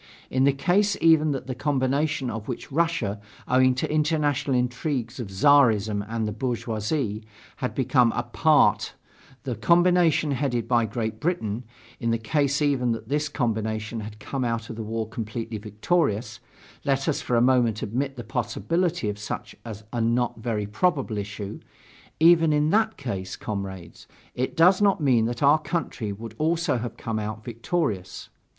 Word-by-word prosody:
In 130 +1 +3
the 140 - +5
case 180 +9 +1
even 160 -2 +5
that 135 -3 -2
the 130 - -4
combination 140 +1 0
of 110 -1 -6
which 125 +4 -6
Russia, 140 -10 0 0.3
owing 130 0 +4
to 130 - -2
international 150 -3 +1
intrigues 125 0 -2
of 120 - -4
Czarism 110 -3 +4
and 115 -1 -1
the - - -2
bourgeoisie, 110 0 -2 0.4
had 125 - -3
become 125 -2 +3
a 120 - -1
part 150 +6 +3 0.5
the 130 -3 -2
combination 170 - +3
headed 130 -4 -1
by 120 -2 +2
Great 110 0 -3
Britain 120 - -2 0.3
in 115 - -1
the 115 - +2
case 140 +5 0
even 130 -5 +2
that 115 - -7
this 150 +1 0
combination 110 -4 -2
had 105 0 -8
come 135 +4 -3
out 115 -1 -2
of - - -7
the 115 - -5
war 110 0 -3
completely 110 0 -5
victorious 110 - -1 0.4
let 135 -1 0
us 155 - 0
for 125 - -1
a - - +5
moment 120 -3 +3
admit 135 +6 -2
the 120 - -5
possibility 165 - -1
of 105 0 -3
such 105 - -6 0.4
a 120 - -1
not 115 +1 0
very 110 -2 -2
probable 120 - 0
issue 100 0 -6 0.6
even 165 -1 +6
in 150 +1 +2
that 220 +1 +2
case, 95 -8 -4
comrades, 95 -5 -6 0.3
it 130 +1 -3
does 180 +4 +5
not 200 -2 +3
mean 125 -7 +3
that 120 +3 -3
our 145 +3 +6
country 155 -10 -3
would 110 +2 -8
also 160 -3 +1
have 120 +1 -6
come 110 -1 -3
out 110 0 -5
victorious. 115 - -3
125 Hz, 160 wpm, -25 LUFS, 110-150 Hz, 0.6 s, even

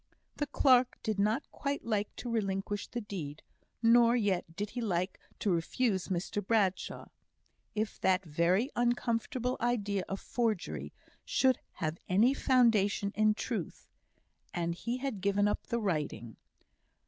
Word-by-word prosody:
The 295 - -1
clerk 255 -2 +4
did 215 -3 -1
not 215 +7 +1
quite 285 0 -3
like 210 -3 -1
to 245 - -5
relinquish 205 -2 -1
the 240 - -4
deed, 160 -8 -6 0.4
nor 235 +1 +6
yet 190 -7 0
did 205 +3 -3
he 245 - -4
like 185 -4 -1 0.2
to 205 - 0
refuse 190 +4 0
Mr 190 +2 -2
Bradshaw. 195 -3 0 0.7
If 215 0 -2
that 190 0 +2
very 175 - +1
uncomfortable 240 +1 0
idea 205 -5 0
of 195 - -3
forgery 225 -6 -2 0.3
should 260 -2 +2
have 160 0 -3
any 215 +8 +5
foundation 220 -7 +3
in 215 0 +3
truth - - -4 0.7
and 170 -1 0
he 235 +8 -3
had 255 -7 -4
given 200 +1 +2
up 205 - -2
the 235 -1 0
writing! 150 - -2
205 Hz, 135 wpm, -32 LUFS, 190-240 Hz, 0.7 s, nor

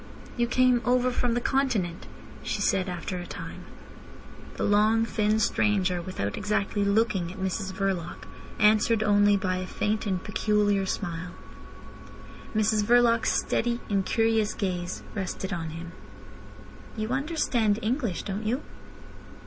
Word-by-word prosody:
"You 240 -1 +1
came 250 0 +3
over 250 0 +2
from 245 -1 0
the - - +2
Continent?" 240 -10 0 0.3
she - - -3
said 190 0 +1
after 180 +1 -4
a 175 - -7
time. - - -8 0.9
The - - -3
long, 215 +2 +3
thin 215 -1 +1
stranger, 195 -4 +1
without 170 - -4
exactly 205 0 0
looking 200 -4 +1
at 190 - -10
Mrs 190 +1 -2
Verloc, 190 -3 -3 0.3
answered 215 +1 +4
only 205 -1 +4
by 185 -1 -1
a 185 0 -4
faint 215 +3 -1
and 185 -2 -1
peculiar 205 -2 +1
smile. 175 -2 -4 1.2
Mrs 215 0 +2
Verloc's 230 0 +4
steady, 235 0 0
incurious 220 +2 +1
gaze 180 -2 -3
rested 190 -1 -4
on 165 -2 -3
him. 165 +1 -8 1.1
"You 215 0 -2
understand 255 -6 +1
English, 230 - -1
don't 205 +1 -4
you?" 250 +7 -1
210 Hz, 130 wpm, -27 LUFS, 185-225 Hz, 1.2 s, answered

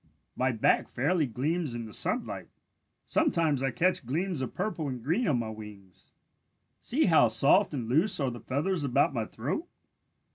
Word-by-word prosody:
My 130 0 +1
back 110 -2 +1
fairly 150 +4 0
gleams 145 +3 -2
in 115 -1 -5
the 110 - -10
sunlight. - - -1 0.6
Sometimes 155 -5 +1
I 135 - +1
catch 180 +6 +1
gleams 160 +5 -2
of 130 - -5
purple 180 -6 -2
and 125 -3 -6
green 175 - 0
on 135 - +2
my 115 -2 -3
wings. 105 -4 -12 0.7
See 295 +6 +2
how 160 -9 +5
soft 140 - +4
and 125 -7 -4
loose 170 - +2
are 135 -3 0
the 120 - -8
feathers 145 - -2
about 140 +1 +2
my 115 -4 -2
throat. 145 - -4
140 Hz, 170 wpm, -29 LUFS, 120-170 Hz, 0.7 s, how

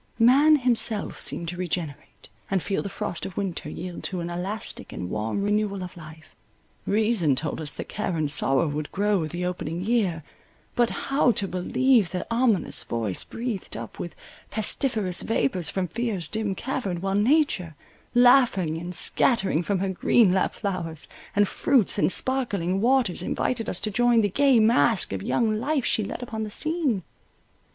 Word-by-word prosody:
Man 270 +7 +6
himself 240 -6 0
seemed 170 - -2
to 175 - -6
regenerate, 165 -5 -5 0.2
and 190 -3 0
feel 195 - -1
the 200 - -5
frost 175 - -4
of 185 - -7
winter 185 -6 -3
yield 175 +2 -7
to 185 - -3
an 170 0 -4
elastic 195 +5 -5
and 90 - -6
warm 110 - -2
renewal 205 -2 0
of 180 - -8
life—reason 165 - -1
told 155 +3 -3
us 150 - -1
that - - -7
care 190 -5 -3
and 150 -2 0
sorrow 145 +1 +1
would 150 0 -4
grow 205 0 +1
with 155 -2 -3
the 175 +1 -3
opening 175 -2 -3
year—but 210 +2 -2
how 275 -2 +1
to 200 - -1
believe 210 +4 +2
the 180 +1 -4
ominous 230 -5 +1
voice 110 -5 -2
breathed 230 -5 -5
up - - -8
with 175 - -6 0.3
pestiferous 215 -4 0
vapours 170 -5 0
from 190 -2 -2
fear's 210 -3 -3
dim 215 -1 -2
cavern, 205 -7 -3
while 195 +2 -2
nature, 205 - +2 0.4
laughing 240 - +4
and 175 +1 -6
scattering 195 - +2
from 200 +3 -1
her 195 +1 -1
green 190 +2 +3
lap 190 - +1
flowers, 170 -6 -4 0.3
and 205 0 +4
fruits, 240 -5 +2
and - - +3
sparkling 200 -9 0
waters, 245 -7 +2
invited 225 +4 -2
us 175 - -2
to 215 - -2
join 240 +1 +3
the 205 - +1
gay 270 +3 +4
masque 225 - +4
of 95 - -3
young 215 - 0
life 275 +1 0
she 215 - +1
led 225 - -5
upon 220 -2 -5
the 215 - -3
scene? 300 - -1
195 Hz, 165 wpm, -25 LUFS, 175-235 Hz, 0.4 s, Man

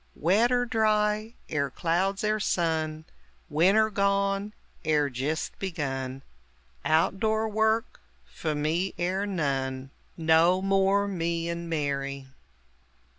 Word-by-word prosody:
Wet 205 - +3
er 245 0 +2
dry, 215 -1 +1 0.2
er 140 -2 0
clouds 180 +8 0
er 215 0 +1
sun 160 -5 -1 0.5
Winter 195 +8 +4
gone, 200 0 +1 0.3
er 150 -2 +2
jist 140 +6 -2
begun 135 -7 -4 0.6
Out 165 +4 +2
door 220 +1 +1
work 220 +1 0 0.3
few 155 -2 -4
me 160 +6 -1
er 190 +3 0
none. 135 -7 -2 0.3
No 165 +2 +4
more 195 +1 +2
"Me 170 -3 -2
and 170 0 -4
Mary!" 140 -3 -2
175 Hz, 110 wpm, -27 LUFS, 155-200 Hz, 0.6 s, Winter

